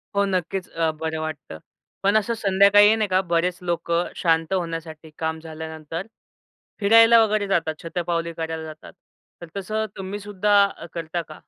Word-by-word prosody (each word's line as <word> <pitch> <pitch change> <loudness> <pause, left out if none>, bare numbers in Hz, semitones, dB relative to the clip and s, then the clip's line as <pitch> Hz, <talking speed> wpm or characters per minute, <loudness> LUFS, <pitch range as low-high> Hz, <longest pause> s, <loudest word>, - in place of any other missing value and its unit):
हो 200 - +3
नक्कीच, 185 0 -2
अ, 165 -1 0
बरं 160 0 -3
वाटतं. 150 - -6 0.5
पण 200 +2 +4
असं 215 +2 0
संध्याकाळी 205 +1 +5
नाही 215 -2 0
का 185 0 +3
बरेच 175 0 0
लोकं 170 0 -1
शांत 165 +1 +1
होण्यासाठी 165 -3 -4
काम 160 0 -2
झाल्यानंतर 160 +2 -7 0.7
फिरायला 225 +3 +7
वगैरे 210 -2 0
जातात. 165 -4 0
शतपावली 170 -1 -2
करायला 160 0 -4
जातात. 155 +3 -11 0.5
तर 170 - -8
तसं 215 +3 -2
तुम्हीसुद्धा 205 +1 -1 0.2
अ, - - -9
करता 170 0 -3
का? 155 - -11
175 Hz, 145 wpm, -23 LUFS, 160-200 Hz, 0.7 s, फिरायला